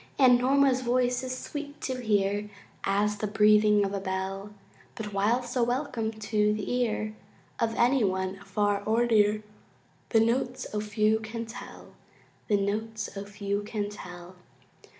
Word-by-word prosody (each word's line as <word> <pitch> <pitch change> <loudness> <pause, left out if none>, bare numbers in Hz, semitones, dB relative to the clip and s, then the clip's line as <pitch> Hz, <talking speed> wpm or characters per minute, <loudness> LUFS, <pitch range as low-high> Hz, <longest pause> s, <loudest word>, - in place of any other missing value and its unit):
And 250 -3 +6
Norma's 265 0 +3
voice 250 0 +1
is 255 0 -4
sweet 290 +1 -7
to 255 -1 -3
hear 205 -2 +1 0.3
As 205 +1 +1
the 215 - -1
breathing 210 0 +5
of 195 - -3
a 200 - -1
bell; 190 +1 -4 0.4
But 210 -2 -6
while 215 +6 +2
so 245 +1 -2
welcome 245 -2 0
to 210 -1 +1
the 210 +2 -3
ear 215 -2 -1 0.5
Of 225 -1 0
any 245 +1 +3
one 190 -1 -1
afar 200 0 0
or 230 +2 +3
near, 215 -2 +3 0.7
The 225 - +4
notes, 245 +3 0
O 210 - 0
few 215 +1 +2
can 225 +1 -5
tell! 225 +2 -10 0.5
The 210 - +3
notes, 210 +1 -3
O 200 0 -5
few 200 0 -3
can 205 -1 -3
tell! 180 -2 -10
215 Hz, 150 wpm, -28 LUFS, 205-240 Hz, 0.7 s, And